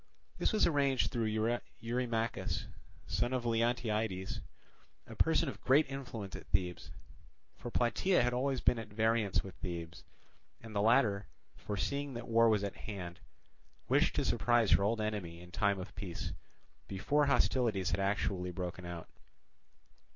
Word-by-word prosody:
This - - +2
was 215 - +4
arranged 140 -4 +2
through 115 -3 0 0.5
Eurymachus, 115 -1 -1 0.4
son 120 +2 0
of 125 -2 -1
Leontiades, 115 -4 0 0.6
a - - -10
person 160 +6 +3
of 135 - -6
great 135 +3 +4
influence 120 -8 -6
at - - -9
Thebes. 90 -2 -1 0.7
For 120 - -7
Plataea 125 +9 +2
had 120 0 +1
always 130 +1 0
been 120 - +3
at 115 - -6
variance 110 -1 +1
with 95 - -8
Thebes; 85 -1 -6 0.6
and 110 -1 -10
the 100 - +2
latter, 105 -3 +3 0.3
foreseeing 130 +8 -3
that 120 - -6
war 115 0 +5
was 105 -2 +2
at 100 - -3
hand, 90 -5 -6 0.7
wished - - +3
to - - +1
surprise 120 -3 +3
her - - +6
old 110 +3 +1
enemy 100 -6 -3
in 90 0 -12
time 100 +1 +2
of 95 +1 -7
peace, 95 -4 -5 0.5
before 140 +10 +1
hostilities 115 -9 +2
had 90 - 0
actually 95 -2 0
broken 90 0 -5
out. 85 -2 -6
110 Hz, 145 wpm, -34 LUFS, 95-120 Hz, 0.7 s, her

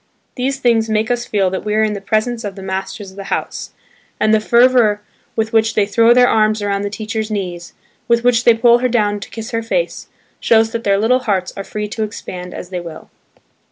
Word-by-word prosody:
These 265 +2 -2
things 230 -4 +2
make 220 +2 0
us 240 0 -2
feel 195 -3 +1
that 190 - -3
we 210 0 -1
are 220 - +3
in 215 -1 0
the 200 - -6
presence 220 +4 -1
of 200 -2 -5
the 195 - -9
masters 190 +1 -5
of 190 - -18
the 200 - -7
house; - - -4 0.5
and 215 - +3
the 220 - +5
fervour 235 -2 +4 0.4
with 220 0 -1
which 225 0 +2
they 210 - +3
throw 230 +3 +3
their 245 +1 +6
arms 215 -1 +2
around 200 -1 -1
the 205 - -2
teacher's 215 +1 -4
knees, 180 -5 -5 0.3
with 235 0 +2
which 245 -1 +3
they 235 - +6
pull 235 +1 +4
her 250 +1 0
down 210 -3 +1
to 200 - -9
kiss 225 +2 -7
her 230 -1 -1
face, - - -2 0.3
shows 225 -1 +3
that 230 -1 -4
their 200 -1 +2
little 235 +5 +2
hearts 200 -7 -1
are 195 - -5
free 210 +1 -5
to 220 - -5
expand 180 -4 -6
as 180 - -8
they 180 - -3
will. 165 -2 -10
215 Hz, 230 wpm, -17 LUFS, 200-235 Hz, 0.5 s, their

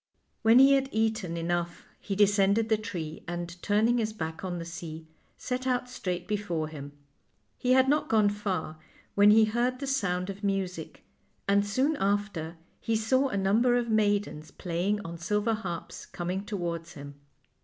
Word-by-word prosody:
When 225 +1 +6
he 270 +1 +8
had 270 -1 +2
eaten 220 -6 -1
enough 170 0 -2
he 200 - -4
descended 205 +2 +3
the 220 - +4
tree, 165 -7 -6
and, 175 0 -4
turning 225 +4 +2
his 220 -1 -1
back 160 -5 -5
on 180 -2 -3
the 170 - -5
sea, 165 -1 -7 0.3
set 255 +1 -3
out 250 -1 0
straight 180 -7 -4
before 175 -7 -2
him. 145 -2 -9 0.7
He 250 0 +2
had 260 0 +5
not 295 +3 +1
gone 215 -2 +4
far 195 -7 -3 0.3
when 205 +1 +6
he 220 +1 +7
heard 240 +3 0
the 275 - -5
sound 200 -9 -1
of 200 +2 -12
music, 195 -2 -3 0.4
and 200 0 +4
soon 260 +9 0
after 195 -5 -1 0.2
he 225 - -1
saw 260 +5 +2
r - - -6
a - - 0
number 220 +6 +3
of 240 -1 -1
maid 205 -1 +2
ens 155 +1 -10
playing 180 +4 -2
on 170 0 -7
silver 210 +6 0
harps 185 -6 -6
coming 180 +3 -4
towards 170 -4 -4
him. 145 -1 -9
200 Hz, 175 wpm, -28 LUFS, 175-225 Hz, 0.7 s, he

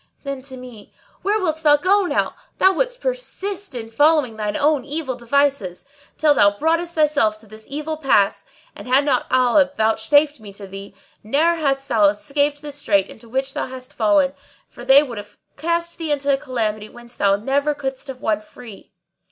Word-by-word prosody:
Then 275 -2 -5
to 260 - -9
me, 245 -5 -12 0.3
"Where 420 +2 +1
wilt 320 -5 -1
thou 295 -2 +5
go 380 +4 +2
now? - - 0 0.2
Thou 380 +1 +5
wouldst - - -2
persist 405 - -4
in 225 -2 -6
following 290 -2 +3
thine 210 -1 -3
own 295 -2 +2
evil 290 -1 -3
devices, 240 -6 0 0.3
till 305 -1 +4
thou 205 -6 +3
broughtest 335 +4 0
thyself 290 -9 +2
to 215 - -13
this 215 +1 -14
ill 305 +2 -4
pass; 240 -9 +2 0.3
and, - - -10
had 265 +3 +4
not 265 -4 0
Allah 255 +3 +4
vouchsafed 230 +7 +2
me 205 -2 -11
to 200 0 -9
thee, 195 +1 -10 0.3
ne'er 295 +10 +2
hadst 275 -4 -1
thou 220 -4 +3
escaped 285 +8 -1
this 290 -1 -8
strait 200 -8 +1
into 230 +1 -14
which 265 +2 -2
thou - - -3
hast 255 0 -10
fallen, 290 -3 +2 0.3
for 240 - -12
they 270 +3 +7
would 240 -7 -6
have 205 0 -12 0.2
cast 340 +3 -2
thee 320 -2 -2
into 285 -1 +1
a - - +2
calamity 220 -6 -3
whence 240 0 -12
thou 200 -1 +3
never 280 +7 0
couldest 270 -1 -4
have 260 -2 -8
won 210 -1 0
free. 215 -1 -14
275 Hz, 185 wpm, -21 LUFS, 225-300 Hz, 0.3 s, they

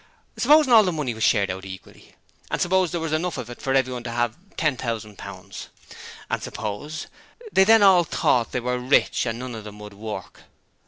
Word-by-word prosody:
Supposing 300 -4 +5
all 225 - +9
the 185 -4 0
money 150 -7 -2
was 110 0 -4
shared 100 -4 +3
out 95 +1 -7
equally; 95 -1 -12 0.3
and - - -2
suppose 185 0 +2
there 170 - -3
was 160 -1 -3
enough 170 +2 -1
of 120 0 -6
it 120 - -11
for 135 -1 0
everyone 130 -2 0
to - - -3
have 120 -1 -1 0.2
ten 155 -4 +1
thousand 110 -4 -5
pounds; - - -9 0.6
and - - -2
suppose 110 +10 -5 0.5
they 190 - +5
then 225 0 +6
all 185 -3 +6
thought 125 -6 +1
they - - -1
were 125 +1 -1
rich 125 0 +2
and 115 0 -2
none 125 0 -6
of 110 -2 -7
them 105 0 -10
would 105 -1 -10
work. 105 +1 -8
125 Hz, 205 wpm, -23 LUFS, 110-165 Hz, 0.6 s, all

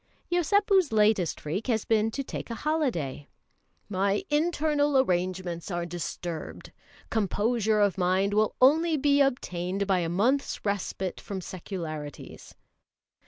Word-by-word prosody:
Yosépu's 380 - +3
latest 210 -5 +2
freak 180 - -4
has 225 -4 0
been 220 -1 +2
to 275 +5 -4
take - - -6
a 230 - -3
holiday. 230 - -2 0.6
"My 200 0 0
internal 295 -2 +2
arrangements 180 -6 -1
are 175 -2 -2
disturbed; 170 -1 -6 0.4
composure 220 +1 +1
of 200 -2 +2
mind 185 +3 +2
will 215 0 +2
only 315 +5 +4
be 285 0 +3
obtained 195 -8 0
by 190 -2 +2
a 170 -2 -1
month's 235 +12 0
respite 195 -2 -2
from 195 -2 -5
secularities." 165 -5 -7
205 Hz, 120 wpm, -27 LUFS, 180-275 Hz, 0.6 s, only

